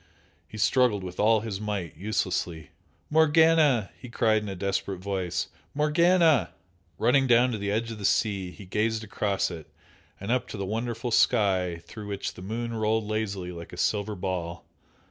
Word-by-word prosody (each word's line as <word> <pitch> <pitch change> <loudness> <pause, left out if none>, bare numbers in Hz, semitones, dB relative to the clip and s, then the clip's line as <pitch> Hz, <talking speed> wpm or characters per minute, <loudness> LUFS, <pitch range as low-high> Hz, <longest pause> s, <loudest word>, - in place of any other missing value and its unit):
He 110 - -10
struggled 115 -3 +2
with 90 -1 -8
all 110 +1 +4
his 105 -3 -5
might, 100 -6 -3
uselessly. 85 -4 -2 0.4
"Morganna!" 160 -7 +4
he 125 - -11
cried 110 -2 +2
in 105 - -6
a 95 - -5
desperate 100 0 -2
voice 95 -2 -3 0.3
"Morganna!" 155 - +4 0.5
Running 135 +5 +3
down 125 +1 +5
to 110 - -3
the 100 0 -2
edge 115 +3 -1
of 110 - -7
the - - -7
sea 100 -3 +1
he 100 +2 -12
gazed 110 +4 -1
across 100 -3 -1
it 80 -4 -9 0.5
and 100 +4 -4
up 125 0 +1
to - - -7
the 100 - -3
wonderful 115 +3 -3
sky 95 -8 +2
through 105 +4 -9
which 100 -1 -4
the - - -12
moon 115 +4 -4
rolled 110 -1 0
lazily 100 -4 -3
like 85 -1 -9
a - - -8
silver 105 0 0
ball. 90 -3 -4
105 Hz, 170 wpm, -27 LUFS, 95-115 Hz, 0.5 s, down